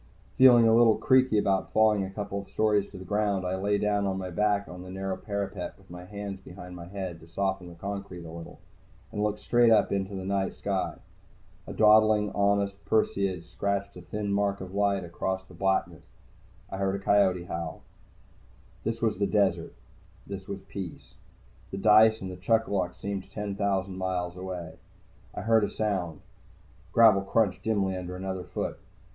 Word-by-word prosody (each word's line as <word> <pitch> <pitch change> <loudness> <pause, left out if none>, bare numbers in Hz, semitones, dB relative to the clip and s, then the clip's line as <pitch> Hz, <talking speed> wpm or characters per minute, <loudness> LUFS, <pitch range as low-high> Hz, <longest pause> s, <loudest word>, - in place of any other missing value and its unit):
Feeling 120 -3 +7
a 110 - +5
little 115 -2 +6
creaky 130 -4 +4
about 95 -2 +1
falling 110 -2 +4
a 95 - -4
couple 100 0 -4
stories 105 -2 +1
to - - -11
the 95 - -9
ground, 100 -1 0
I 90 +1 -1
lay 100 +2 +1
down 105 -1 +1
on 95 -1 -1
my 95 -1 -5
back 100 +2 +1
on 90 0 -9
the 90 - -10
narrow 95 0 -3
parapet, 100 -3 -4
with 95 -2 -20
my 90 0 -9
hands 100 0 -6
behind 90 -1 -11
my 85 -1 -9
head 95 -3 -5
to 80 - -15
soften 95 +1 -2
the 85 - -12
concrete 100 -1 -6
a 80 - -8
little, 85 0 -9 0.5
and 105 -2 -3
looked 105 0 0
straight 120 +1 +3
up 110 - +4
into 100 0 -2
the 95 -1 -5
night 95 0 -1
sky. 100 -2 -2 0.7
A - - -6
dawdling 110 -1 +5
August 100 -1 +1
Perseid 100 -5 0
scratched 100 +1 -3
a 90 - -9
thin 100 +3 -3
mark 100 0 +1
of 95 0 -8
light 100 -1 +1
across 95 +2 -3
the 95 - -16
blackness. 95 +2 0 0.7
I 95 - -4
heard 95 0 0
a 100 - -6
coyote 95 -3 +3
howl. 85 -2 -5 1.0
This 115 +1 -3
was 110 -4 +1
desert. 100 -4 +1 0.5
This 95 -1 -7
was 100 -1 -5
peace. 95 -4 -8 0.6
The 95 - -5
dice 110 +2 +6
and 90 -1 -7
chuck 115 +3 +2
a - - -5
luck 90 -2 -1
seemed 100 -1 -5
ten 105 -1 -4
thousand 95 -2 -1
miles 90 -1 -2
away. 90 -3 -6 0.6
I - - -4
heard 110 -1 +3
a - - 0
sound. 95 -7 -2 0.7
Gravel 110 -4 +6
crunched 100 0 +1
dimly 100 -4 0
under 90 0 -5
another 95 -1 -4
foot. 90 - -4
100 Hz, 180 wpm, -28 LUFS, 95-105 Hz, 1.0 s, Feeling